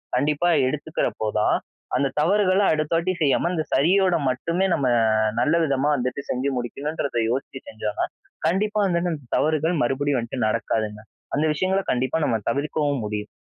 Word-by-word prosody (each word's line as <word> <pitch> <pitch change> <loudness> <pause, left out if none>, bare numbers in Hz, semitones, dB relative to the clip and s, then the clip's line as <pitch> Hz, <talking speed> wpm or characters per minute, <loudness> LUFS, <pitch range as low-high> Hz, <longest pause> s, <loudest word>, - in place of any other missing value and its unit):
கண்டிப்பா 150 +4 +1 0.2
எடுத்துக்கிறப்போ 140 -6 -2
தான், 105 - +3 0.4
அந்த 140 - +2
தவறுகள 195 +1 +3
அடுத்த 155 +1 -1
வாட்டி 180 +3 0
செய்யாம 150 +4 +2
அந்த 160 - 0
சரியோட 180 +5 +3
மட்டுமே 170 +9 0
நம்ம 140 - 0 0.5
நல்ல 155 - +2
விதமா 140 0 +1
வந்துட்டு 125 +1 -2
செஞ்சு 130 +3 0
முடிக்கணுன்றத 140 +3 -3
யோசிச்சு 135 +1 -3
செஞ்சா 110 -1 -4
தான், - - -1 0.4
கண்டிப்பா 210 +5 0
வந்துட்டு 175 -2 0
அந்த 140 -6 -9
தவறுகள் 155 +2 +1
மறுபடியும் 135 +2 0
வந்துட்டு 120 0 -2
நடக்காதுங்க. 110 -1 -1 0.4
அந்த 150 +3 +1
விஷயங்கள 190 +4 +1
கண்டிப்பா 130 +4 0
நம்ம 115 - +1
தவிர்க்கவும் 145 +1 -1
முடியும். 105 0 -4
145 Hz, 150 wpm, -23 LUFS, 125-170 Hz, 0.5 s, தான்